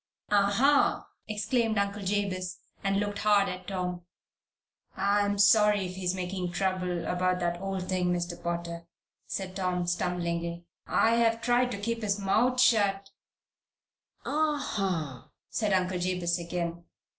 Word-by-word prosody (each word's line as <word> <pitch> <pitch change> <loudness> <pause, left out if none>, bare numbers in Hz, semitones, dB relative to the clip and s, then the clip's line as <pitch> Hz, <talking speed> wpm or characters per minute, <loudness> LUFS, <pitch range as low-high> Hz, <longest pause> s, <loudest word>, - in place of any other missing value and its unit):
"Ah 200 -1 +4
ha!" 275 +7 +3 0.2
exclaimed 220 +1 0
Uncle 200 +1 -1
Jabez, 185 -2 -2 0.3
and 195 0 +1
looked 205 0 -2
hard 205 -1 +4
at 185 -1 -6
Tom. 180 -2 -3 0.9
"I'm 205 +1 +2
sorry 205 -1 +5
if 180 - -5
he 185 -1 -1
makes 180 -1 -3
trouble 180 -3 -1
about 180 +1 0
that 175 0 -1
old 195 -2 -3
thing, 180 -1 0
Mr. 175 0 -3
Potter," 170 0 -4 0.4
said 190 -1 -4
Tom, 180 -2 -1
stumblingly. 170 -1 -2 0.2
"I've 230 0 +3
tried 245 +1 +2
to - - -3
keep 230 +3 -3
his 205 -1 0
mouth 235 +6 +2
shut 200 -5 +3 0.6
" - - -43
"Ah 300 +1 +1
ha!" 170 - -3 0.2
said 215 -3 0
Uncle 185 -1 +1
Jabez, 175 -1 0
again. 170 0 -4
190 Hz, 135 wpm, -29 LUFS, 180-205 Hz, 0.9 s, sorry